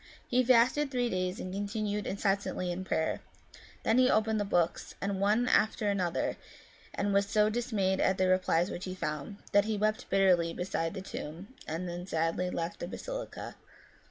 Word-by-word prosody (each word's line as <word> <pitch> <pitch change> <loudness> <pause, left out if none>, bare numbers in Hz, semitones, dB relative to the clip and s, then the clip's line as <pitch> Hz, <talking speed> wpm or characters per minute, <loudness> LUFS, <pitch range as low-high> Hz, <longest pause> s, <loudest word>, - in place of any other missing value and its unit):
He 250 +1 +3
fasted 255 +4 +4
three 245 -2 0
days 185 +1 -1
and 185 - -5
continued 205 +1 -2
incessantly 195 -2 -1
in 180 +2 -4
prayer; 160 -3 -1 0.6
then 225 +3 +3
he 255 0 +5
opened 220 -1 +2
the - - +1
books, 175 -4 0
one 200 +4 +1
after 215 -2 +2
another, 180 -4 -1 0.6
and 200 0 0
was 200 0 +3
so 210 +1 +3
dismayed 210 -5 0
at 190 - +2
the 185 - +2
replies 185 -1 +2
which 175 - -5
he 185 -1 -5
found, 155 +3 -4
that 205 0 +5
he 215 -1 -1
wept 215 +1 0
bitterly 180 -4 +3
beside 180 -1 -2
the 190 - -5
tomb, 175 +6 -7
and 165 +3 -3
then 175 +1 -5
sadly 165 +2 0
left 170 -1 -3
the 175 - -4
basilica. - - -6
195 Hz, 170 wpm, -31 LUFS, 180-215 Hz, 0.6 s, he